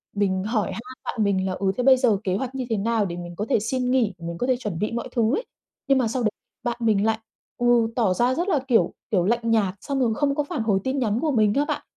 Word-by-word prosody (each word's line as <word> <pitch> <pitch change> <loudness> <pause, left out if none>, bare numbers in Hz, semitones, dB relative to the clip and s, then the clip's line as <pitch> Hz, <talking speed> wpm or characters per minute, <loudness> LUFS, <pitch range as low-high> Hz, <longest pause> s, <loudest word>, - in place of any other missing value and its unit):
mình 190 -2 +1
hỏi 215 -3 -1
han 225 - -5 0.2
bạn 220 - -1
mình 195 -2 +1
là, 185 - -1
ừ, 190 0 0
thế 250 - 0
bây 265 0 +7
giờ 245 -6 +3
kế 185 -2 0
hoạch 255 +4 -3
như 260 -1 -2
thế 225 - 0
nào 220 +1 +1
để 175 -2 -5
mình 175 0 -7
có 205 - -3
thể - - +3
xin 250 +4 -1
nghỉ, 235 -7 +2
mình 170 0 -5
có 245 - -1
thể 255 -1 +2
chuẩn 210 -9 -4
bị 210 - -1
mọi 235 +2 -3
thứ 235 +3 +2
ấy. 480 - -3 0.4
Nhưng 275 -1 +4
mà 255 -3 +2
sau 245 +3 -2
đấy 215 - +3 0.3
bạn 240 -1 -2
mình 215 -3 +2
lại, 220 0 +1 0.4
ừ, 240 -1 +3
tỏ 215 -7 +2
ra 245 +5 +2
rất 350 +3 -1
là, 300 - +3
kiểu, 240 -3 +3 0.2
kiểu, 180 -5 +2
lạnh 230 +2 +1
nhạt 200 -4 +2
xong 275 -1 -2
rồi 235 -3 +2
không 280 +1 +1
có 295 - +1
phản 285 - -3
hồi 205 -3 +2
tin 265 +1 -1
nhắn 220 -2 0
của 310 -2 +1
mình 215 -4 +3
á 285 - +2
bạn. - - -2
225 Hz, 285 wpm, -24 LUFS, 200-255 Hz, 0.4 s, bây